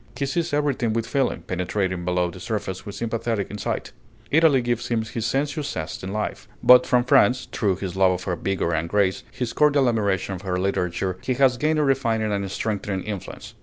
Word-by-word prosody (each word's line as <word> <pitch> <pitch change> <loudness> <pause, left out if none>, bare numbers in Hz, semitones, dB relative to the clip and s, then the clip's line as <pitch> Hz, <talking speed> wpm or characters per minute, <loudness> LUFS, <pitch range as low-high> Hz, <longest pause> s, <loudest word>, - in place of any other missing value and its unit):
He 140 - 0
sees 165 +5 -1
everything 140 -6 0
with 115 0 -1
feeling, 135 +2 -1
penetrating 90 0 -2
below 90 -1 0
the 90 - -11
surface 95 -2 -4
with 100 - -6
sympathetic 115 -1 -2
insight. 105 -1 -3 0.4
Italy 150 -5 +4
gives 120 -1 -1
him 115 -2 0
his 110 0 -3
sensuous 145 +3 -1
zest 80 +1 -5
in 95 - -4
life. 105 +1 -3 0.2
But 125 0 +7
from 125 -1 +3
France, 125 0 +4
through 100 -4 +1
his 95 -1 -5
love 95 -1 +4
of 90 0 -4
her 90 -1 -1
vigor 85 -1 -1
and 80 +1 -1
grace, 100 -1 +1
his 125 -2 -4
cordial 145 -3 +4
admiration 100 -5 0
of 90 - -6
her 95 -2 -2
literature, 90 -1 -1
he 130 - -1
has 130 -1 +3
gained 155 +4 +1
a 150 - +3
refining 115 -6 +1
and 100 -1 -2
strengthening 100 -2 -2
influence. 105 -4 -7
110 Hz, 200 wpm, -24 LUFS, 95-125 Hz, 0.4 s, But